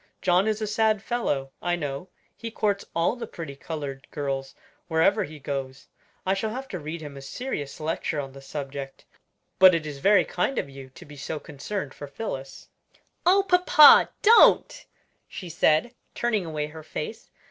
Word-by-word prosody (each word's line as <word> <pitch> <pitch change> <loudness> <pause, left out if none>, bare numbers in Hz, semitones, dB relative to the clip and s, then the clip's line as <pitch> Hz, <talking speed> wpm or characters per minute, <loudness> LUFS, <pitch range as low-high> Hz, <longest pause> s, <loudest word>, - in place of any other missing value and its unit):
John 185 +2 +3
is 215 0 -1
a - - 0
sad 215 -1 +1
fellow, 145 - -2
I 175 0 0
know; 145 +1 -5 0.3
he 230 - -6
courts 205 -2 -1
all 170 +7 +2
the 235 -2 -6
pretty 160 -8 -8
colored 140 -2 -6
girls 135 -2 -4 0.3
wherever 185 +5 +2
he 155 -1 -11
goes. 135 -1 -5 0.4
I 190 - +2
shall 195 +3 -2
have 260 +4 -6
to 185 - -5
read 155 +2 -6
him 145 -2 -8
a - - -8
serious 145 - -5
lecture 155 0 -2
on 135 -1 -5
the 135 +1 -12
subject. 135 -1 -7 0.5
But 185 -2 +8
it 160 -2 -2
is 145 -2 -6
very 200 +6 +4
kind 180 +10 -1
of - - -1
you 135 -1 -11
to 130 - -14
be 150 0 -13
so 150 +2 -5
concerned 150 +3 -6
for 145 - -9
Phillis." 135 -5 -7 0.6
"Oh, 390 +2 +5
papa, 360 -5 +7
don't!" 465 +3 +5 0.4
she 180 - -8
said, 160 +7 +2 0.2
turning 220 -7 0
away 155 -2 -2
her 160 +1 -10
face. 155 +6 -7
160 Hz, 175 wpm, -26 LUFS, 140-210 Hz, 0.6 s, But